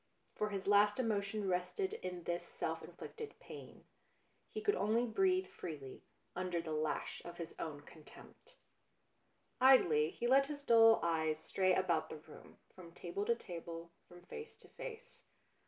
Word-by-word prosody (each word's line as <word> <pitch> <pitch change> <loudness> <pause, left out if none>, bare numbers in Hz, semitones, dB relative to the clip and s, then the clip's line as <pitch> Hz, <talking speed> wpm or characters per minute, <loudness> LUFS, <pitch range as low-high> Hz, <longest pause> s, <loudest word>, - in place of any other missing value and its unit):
For 210 - 0
his 195 -2 -4
last 205 +2 +5
emotion 210 -3 0
rested 185 - -1
in 180 - -5
this 175 +1 -2
self - - -3
inflicted 450 -1 -8
pain; - - -11 0.7
he - - -3
could 415 -1 +2
only 225 - +2
breathe 370 - +2
freely 140 -5 -8 0.3
under 180 -1 -1
the 165 -1 -5
lash 155 0 -2
of 175 0 -8
his 170 -2 -6
own 150 -3 -4
contempt. 160 - -15 1.0
Idly 175 - +6
he 235 - -5
let 270 +3 +5
his 285 -1 -6
dull 225 -3 +7
eyes 160 -2 +1
stray 185 -1 +2
about 170 -4 +1
the - - -6
room, 155 0 -14 0.2
from 170 -2 -12
table 185 +3 -3
to 235 - +3
table, 170 -4 -7 0.2
from 175 0 -14
face 450 - -9
to - - -16
face. - - -9
190 Hz, 155 wpm, -36 LUFS, 170-250 Hz, 1.0 s, dull